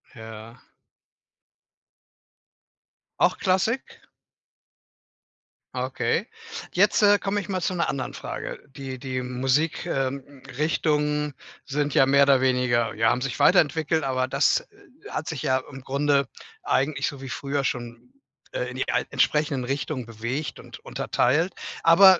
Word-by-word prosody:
Ja. 110 0 -10 2.6
Auch - - +3
Klassik? 190 +7 0 1.8
Okay. - - -1 0.5
Jetzt, - - +4
äh, 205 0 +6
komme 200 +1 -1
ich 180 - -9
mal 185 -2 -2
zu 185 - -1
'ner 170 - 0
anderen 130 - -3
Frage. - - -6
Die 135 -2 -6
die 130 0 -3
Musik 130 +7 0
ähm, 135 -2 -3 0.2
Richtungen 150 -1 +1 0.3
sind 145 0 -1
ja 135 - +5
mehr 140 +1 +6
oder 140 -2 +5
weniger 125 -3 +2
ja, 115 +1 +3
haben 125 - 0
sich 135 0 -3
weiterentwickelt, 160 -2 +3
aber 130 -1 0
das, - - +3
äh, 410 - -18
hat - - -3
sich 160 -5 -4
ja 130 0 +2
im 135 -1 -9
Grunde 140 0 +1 0.4
eigentlich 140 +2 +1
so 140 -2 -4
wie 135 - -7
früher 140 +2 -2
schon, 120 - -4 0.4
äh, - - -2
in - - -8
die - - -2
al - - +1
entsprechenden 150 -3 +1
Richtungen 135 -1 -3
bewegt 115 +6 -4
und - - -11
unterteilt. 155 +9 +1 0.3
Aber 185 +2 +8
140 Hz, 135 wpm, -25 LUFS, 130-165 Hz, 2.6 s, Aber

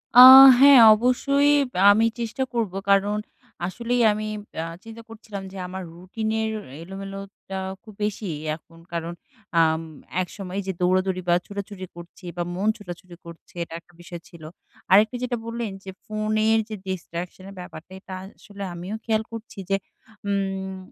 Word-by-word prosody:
আ - - +9 0.4
হ্যাঁ 275 -1 +9 0.2
অবশ্যই 275 +5 +2 0.3
আ - - +6
আমি 225 +2 +3
চেষ্টা 235 +3 -2
করব। 230 -5 -1 0.2
কারণ 200 +1 +3 0.5
আসলেই 240 +5 -1
আমি 215 +1 -3 0.4
আ - - -4 0.2
চিন্তা 225 0 -11
করছিলাম 215 -3 -8
যে 195 - -10
আমার 190 +1 -6
রুটিনের 220 +5 -3 0.3
এলোমেলোটা 195 +1 -8 0.2
খুব 215 -2 -13
বেশি 210 -1 -3 0.3
এখন 165 +1 -19 0.2
কারণ 170 0 -3 0.5
আম 160 0 +3 0.4
একসময় 185 +1 -6
যে - - 0
দৌড়াদৌড়ি 185 +1 +1
বা 175 - +5
ছোটাছুটি 200 -1 -7
করছি 175 +2 -13
বা 175 - 0
মন 200 +3 -1
ছোটাছুটি 180 -2 -10
করছে 170 -1 -13
এটা 165 - -11
একটা 175 +1 -27
বিষয় 175 0 -9
ছিল। 170 -3 -14 0.5
আরেকটা 210 +5 +5
যেটা 245 -1 -2
বললেন 230 -2 -4
যে, 195 - -9 0.2
ফোনের 215 0 +1
যে 215 - -4
Distraction 180 0 -6
এর 200 - -12
ব্যাপারটা, 180 -1 -11
এটা 190 - -11
আসলে 200 +1 -11
আমিও 180 +5 -6
খেয়াল 220 -1 +1
করছি 230 -1 -9
যে 195 - +3 0.5
উম 195 -1 -2
195 Hz, 150 wpm, -24 LUFS, 185-220 Hz, 0.5 s, আ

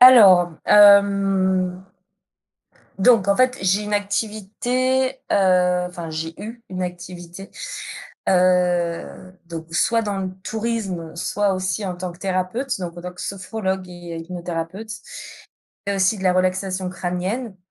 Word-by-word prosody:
Alors, 200 -9 +8 0.2
hem 195 -2 +5 1.1
donc 200 -1 +4
en 200 - +4
fait 255 0 +3
j'ai 190 +2 +2
une 210 0 -2
activité, 220 +6 0 0.2
heu, 180 -2 +3
enfin 170 -2 -7
j'ai 160 +1 -4
eu 230 +2 -8
une 185 0 -4
activité, 175 +1 -7 0.8
heu, 180 -1 +1
donc 165 -1 -8
soit 230 +6 +2
dans 205 -2 -2
le 190 -1 -3
tourisme 210 -8 -3
soit 200 +3 0
aussi 185 +2 -2
en 180 -1 -4
tant 180 0 -5
que 170 - -17
thérapeute 195 +8 -2
donc 175 -1 -5
en - - -9
tant 180 0 -6
que 180 - -12
sophrologue 190 -1 -3
et 175 -2 -8
hypnothérapeute. 175 +4 -5 0.9
Il - - 0
y - - +1
a - - -2
aussi 195 +2 +2
de - - -7
la 185 - +4
relaxation 185 0 0
crânienne, 185 +5 -3
185 Hz, 140 wpm, -22 LUFS, 180-205 Hz, 1.1 s, Alors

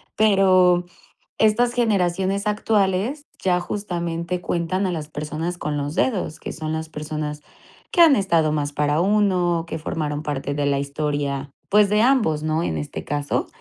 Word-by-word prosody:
Pero 185 -4 +4 0.5
estas 230 +3 +3
generaciones 195 -4 +1
actuales, 210 +5 0 0.2
ya, 180 -1 +2
justamente, 175 -2 -3
cuentan 175 +3 -1
a 185 - 0
las 155 -3 -4
personas 155 +3 -4
con 150 -3 -3
los 145 +1 -3
dedos, 195 -10 0
que - - -6
son 155 0 -5
las 160 0 -3
personas 150 -1 -5 0.5
que 350 - +4
han 320 -5 +8
estado 170 -7 +2
más 145 -1 -2
para 150 +2 +1
uno, 180 -4 +2
que 160 - -4
formaron 150 -2 -3
parte 145 -2 -3
de 145 0 -1
la 140 -1 +2
historia, 140 -1 -2 0.2
pues, 210 0 +5
de 210 +1 +3
ambos, 220 - +2
¿no?, 155 +1 0
en 80 - -2
este 75 +1 -5
caso, 145 0 -2
170 Hz, 160 wpm, -22 LUFS, 150-195 Hz, 0.5 s, han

